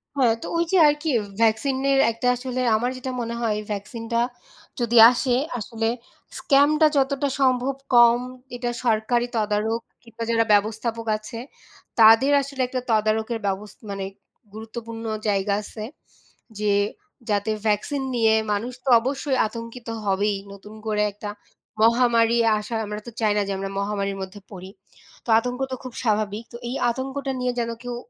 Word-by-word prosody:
হ্যাঁ, 250 Hz, -5 st, +4 dB
তো -, -, -6 dB
ওই 335 Hz, -, +3 dB
যে 380 Hz, -, +4 dB
আর 295 Hz, -, +5 dB
কি 315 Hz, -, 0 dB, 0.3 s
ভ্যাকসিনের 265 Hz, +5 st, +2 dB
একটা 230 Hz, +2 st, -3 dB
আসলে 255 Hz, 0 st, -4 dB
আমার 240 Hz, +3 st, 0 dB
যেটা 255 Hz, 0 st, -5 dB
মনে 235 Hz, 0 st, -4 dB
হয় 220 Hz, -3 st, 0 dB
ভ্যাকসিনটা 225 Hz, +3 st, -3 dB, 0.6 s
যদি 240 Hz, 0 st, +1 dB
আসে 245 Hz, 0 st, 0 dB, 0.2 s
আসলে 225 Hz, +1 st, -3 dB, 0.5 s
স্ক্যামটা 300 Hz, +2 st, +4 dB
যতটা 275 Hz, +1 st, +1 dB
সম্ভব 260 Hz, 0 st, +2 dB, 0.2 s
কম, 240 Hz, 0 st, +7 dB, 0.4 s
এটা 245 Hz, 0 st, -3 dB, 0.2 s
সরকারি 235 Hz, +2 st, +1 dB
তদারক 215 Hz, +2 st, 0 dB, 0.2 s
কিংবা 230 Hz, -1 st, -8 dB
যারা 230 Hz, 0 st, +3 dB
ব্যবস্থাপক 220 Hz, +2 st, 0 dB
আছে 215 Hz, +2 st, -9 dB, 0.6 s
তাদের 225 Hz, +5 st, +7 dB
আসলে 275 Hz, -1 st, -5 dB
একটা 255 Hz, 0 st, -3 dB
তদারকের 220 Hz, +1 st, +1 dB
ব্যবস্থা 200 Hz, +4 st, -5 dB
মানে 195 Hz, -1 st, -4 dB, 0.5 s
গুরুত্বপূর্ণ 225 Hz, +1 st, -8 dB, 0.2 s
জায়গা 200 Hz, 0 st, +1 dB
আছে 215 Hz, +1 st, -8 dB, 0.8 s
যে, 210 Hz, -1 st, +2 dB, 0.6 s
যাতে 205 Hz, +1 st, 0 dB, 0.2 s
ভ্যাকসিন 215 Hz, +7 st, 0 dB
নিয়ে 225 Hz, -2 st, +4 dB, 0.2 s
মানুষ 230 Hz, +5 st, -3 dB
তো 270 Hz, -, -2 dB
অবশ্যই 265 Hz, +2 st, -1 dB
আতঙ্কিত 230 Hz, +2 st, -9 dB, 0.2 s
হবেই, 200 Hz, +1 st, +1 dB, 0.2 s
নতুন 205 Hz, +2 st, -12 dB
করে 210 Hz, -1 st, +1 dB
একটা 205 Hz, +1 st, -7 dB, 0.5 s
মহামারী 235 Hz, 0 st, +4 dB, 0.2 s
আসা 210 Hz, +2 st, -5 dB
আমরা 210 Hz, 0 st, -5 dB
তো 235 Hz, -, -6 dB
চাই 215 Hz, -2 st, +3 dB
না -, -, +3 dB
যে -, -, -2 dB
আমরা 195 Hz, 0 st, -4 dB
মহামারির 200 Hz, -1 st, -2 dB
মধ্যে 190 Hz, +2 st, -7 dB
পড়ি। 185 Hz, -1 st, -9 dB, 0.6 s
তো -, -, -10 dB
আতঙ্ক 245 Hz, +2 st, -4 dB
তো -, -, -1 dB
খুব 255 Hz, -2 st, -8 dB
স্বাভাবিক। 215 Hz, -1 st, 0 dB
তো -, -, -6 dB
এই 250 Hz, -, -3 dB, 0.2 s
আতঙ্কটা 270 Hz, +2 st, -4 dB
নিয়ে 250 Hz, 0 st, 0 dB
যেন 230 Hz, -, -2 dB
কেউ 245 Hz, -1 st, -4 dB
230 Hz, 150 wpm, -23 LUFS, 210-250 Hz, 0.8 s, কম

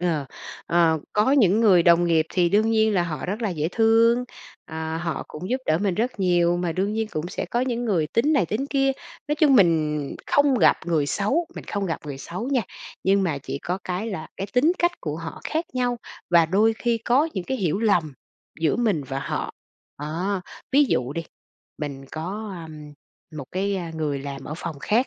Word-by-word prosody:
Ờ, 165 Hz, -5 st, 0 dB, 0.4 s
ờ, 165 Hz, -2 st, +3 dB
có 215 Hz, +6 st, +3 dB
những 220 Hz, -6 st, +4 dB
người 190 Hz, -7 st, +6 dB
đồng 170 Hz, 0 st, +5 dB
nghiệp 165 Hz, -2 st, +2 dB
thì 175 Hz, -1 st, +3 dB
đương 215 Hz, +5 st, +3 dB
nhiên 220 Hz, -1 st, +3 dB
là 180 Hz, -, +3 dB
họ 165 Hz, -3 st, -4 dB
rất 205 Hz, +6 st, -3 dB
là 215 Hz, -, 0 dB
dễ 155 Hz, -2 st, -1 dB
thương, 230 Hz, +2 st, +4 dB, 0.5 s
ờ, 160 Hz, 0 st, -3 dB
họ 165 Hz, -1 st, -3 dB
cũng 180 Hz, +5 st, -7 dB
giúp 255 Hz, -, +2 dB
đỡ 155 Hz, -, +3 dB
mình 195 Hz, -1 st, 0 dB
rất 230 Hz, +2 st, -2 dB
nhiều, 175 Hz, -2 st, +3 dB
mà 175 Hz, -2 st, -1 dB
đương 195 Hz, +4 st, -1 dB
nhiên 220 Hz, 0 st, -1 dB
cũng 155 Hz, +3 st, -3 dB
sẽ -, -, -3 dB
có 240 Hz, -, +1 dB
những 245 Hz, -1 st, -1 dB
người 180 Hz, -9 st, +1 dB
tính 235 Hz, -, +1 dB
này, 280 Hz, -, +3 dB
tính 225 Hz, -, -2 dB
kia. 270 Hz, -1 st, +2 dB, 0.4 s
Nói 295 Hz, -, +2 dB
chung 290 Hz, -3 st, +5 dB
mình 160 Hz, -6 st, +3 dB, 0.3 s
không 285 Hz, -1 st, +3 dB
gặp -, -, +5 dB
người 160 Hz, -4 st, +1 dB
xấu, 215 Hz, -, 0 dB
mình -, -, -8 dB
không 200 Hz, -1 st, -3 dB
gặp 165 Hz, -, -2 dB
người 140 Hz, -2 st, -6 dB
xấu 185 Hz, -, -5 dB
nha, 265 Hz, -4 st, +2 dB, 0.4 s
nhưng 195 Hz, +1 st, +3 dB
mà 160 Hz, -7 st, 0 dB
chỉ 135 Hz, 0 st, -5 dB
có 180 Hz, +5 st, -3 dB
cái 185 Hz, +4 st, -3 dB
là 175 Hz, -8 st, -5 dB
cái 195 Hz, -, -3 dB
tính 280 Hz, +8 st, +4 dB
cách 345 Hz, 0 st, +2 dB
của 150 Hz, -2 st, -4 dB
họ 165 Hz, 0 st, -7 dB
khác 320 Hz, +2 st, -1 dB
nhau, 245 Hz, -1 st, 0 dB, 0.3 s
và 170 Hz, -2 st, +6 dB
đôi 210 Hz, +6 st, +3 dB
khi 235 Hz, -1 st, +1 dB
có 255 Hz, +7 st, +2 dB
những 185 Hz, -, -3 dB
cái 265 Hz, -, -2 dB
hiểu 190 Hz, -5 st, 0 dB
lầm 175 Hz, -10 st, +2 dB, 0.5 s
giữa 160 Hz, -2 st, +2 dB
mình 215 Hz, -10 st, +1 dB
và 135 Hz, +1 st, -4 dB
họ. -, -, -3 dB, 0.5 s
Đó, 175 Hz, +6 st, -2 dB, 0.3 s
ví 290 Hz, +2 st, +6 dB
dụ 125 Hz, -, 0 dB
đi, 165 Hz, +2 st, -3 dB, 0.6 s
mình 140 Hz, -3 st, -5 dB
có, 195 Hz, +6 st, -5 dB
ưm, 150 Hz, -2 st, -11 dB, 0.4 s
một 145 Hz, -, -5 dB
cái, 195 Hz, +2 st, 0 dB
à, 175 Hz, -3 st, -4 dB
người 150 Hz, -3 st, -2 dB
làm 140 Hz, 0 st, -7 dB
ở 150 Hz, -, -5 dB
phòng 165 Hz, -4 st, -6 dB
khác, 235 Hz, -, +2 dB
185 Hz, 215 wpm, -24 LUFS, 160-225 Hz, 0.6 s, người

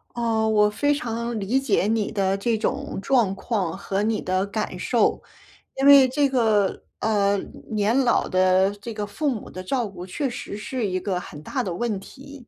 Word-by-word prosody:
呃， 225 Hz, -2 st, +1 dB
我 210 Hz, -1 st, +4 dB
非 290 Hz, +7 st, +1 dB
常 235 Hz, -4 st, -3 dB
理 225 Hz, +7 st, +1 dB
解 270 Hz, -7 st, +1 dB
你 220 Hz, -2 st, 0 dB
的 195 Hz, -1 st, +1 dB
这 225 Hz, +3 st, 0 dB
种 215 Hz, -, -3 dB
状 225 Hz, -5 st, +2 dB
况 195 Hz, -4 st, -2 dB
和 200 Hz, 0 st, -2 dB
你 220 Hz, 0 st, 0 dB
的 185 Hz, +1 st, 0 dB
感 200 Hz, -3 st, -3 dB
受， 235 Hz, +5 st, +1 dB, 0.6 s
因 270 Hz, -, +1 dB
为 280 Hz, -2 st, +9 dB
这 280 Hz, +2 st, +2 dB
个， 220 Hz, -7 st, +1 dB, 0.2 s
呃， 205 Hz, -2 st, +2 dB, 0.3 s
年 215 Hz, +2 st, +1 dB
老 245 Hz, -3 st, +2 dB
的 185 Hz, +1 st, +3 dB
这 230 Hz, +2 st, -6 dB
个 210 Hz, -1 st, -3 dB
父 290 Hz, +9 st, -2 dB
母 235 Hz, -6 st, -4 dB
的 185 Hz, -, -7 dB
照 240 Hz, +3 st, -1 dB
顾 185 Hz, -2 st, -9 dB
确 270 Hz, +10 st, -2 dB
实 240 Hz, -4 st, -6 dB
是 215 Hz, +1 st, -3 dB
一 185 Hz, 0 st, -1 dB
个 185 Hz, -1 st, -2 dB
很 150 Hz, -4 st, -10 dB
大 255 Hz, -, -2 dB
的 185 Hz, -, -3 dB
问 210 Hz, +1 st, -2 dB
题。 275 Hz, +3 st, -13 dB
215 Hz, 200 characters per minute, -24 LUFS, 195-245 Hz, 0.6 s, 为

